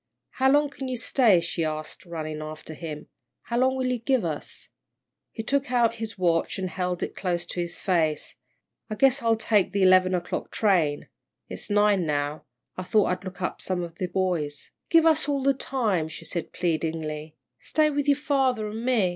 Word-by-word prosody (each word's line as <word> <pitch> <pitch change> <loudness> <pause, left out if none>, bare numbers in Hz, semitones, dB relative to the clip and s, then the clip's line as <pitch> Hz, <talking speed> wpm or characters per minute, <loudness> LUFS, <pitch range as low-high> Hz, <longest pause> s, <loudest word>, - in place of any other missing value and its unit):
"How 265 +1 +2
long 290 0 +3
can 270 -1 -6
you 255 -1 -2
stay?" 230 -6 +4
she 170 0 -2
asked, 155 +3 -5
running 155 -2 -5
after 155 +1 -8
him. 155 -2 -7 0.4
"How 235 0 -1
long 260 +1 +3
will 260 -1 -1
you 250 -1 0
give 255 +2 +1
us?" - - -3 0.6
He 225 - -5
took 275 +2 0
out 235 -2 +2
his 225 -1 -5
watch, 170 -3 +1
and 185 -2 -3
held 180 0 -2
it - - -4
close 175 -2 -2
to 175 - -5
his 175 0 -3
face. 165 -5 0 0.6
"I 215 - -3
guess 270 +4 +3
I'll 230 -1 +3
take 210 -4 +2
the 200 -1 +2
eleven 185 0 +5
o'clock 175 -1 -3
train. 170 -9 +1 0.4
It's - - -6
nine 205 -4 +3
now 145 +1 -2 0.3
I - - -4
thought 200 +2 +2
I'd 180 +1 -3
look 185 -1 -7
up - - -3
some 185 -2 -2
of 170 -1 -9
the 185 - -1
boys." 175 -6 -2 0.2
"Give 330 -1 +5
us 315 -2 +3
all 280 -2 0
the 275 0 +4
time," 225 -11 -1
she 160 +1 -9
said, 170 +1 -4
pleadingly, 160 -2 -2 0.2
"stay 305 0 +2
with 290 0 -1
your 285 -1 +4
father 265 -7 +1
an' 220 +2 -5
me. 240 -7 +2
190 Hz, 195 wpm, -26 LUFS, 165-250 Hz, 0.6 s, eleven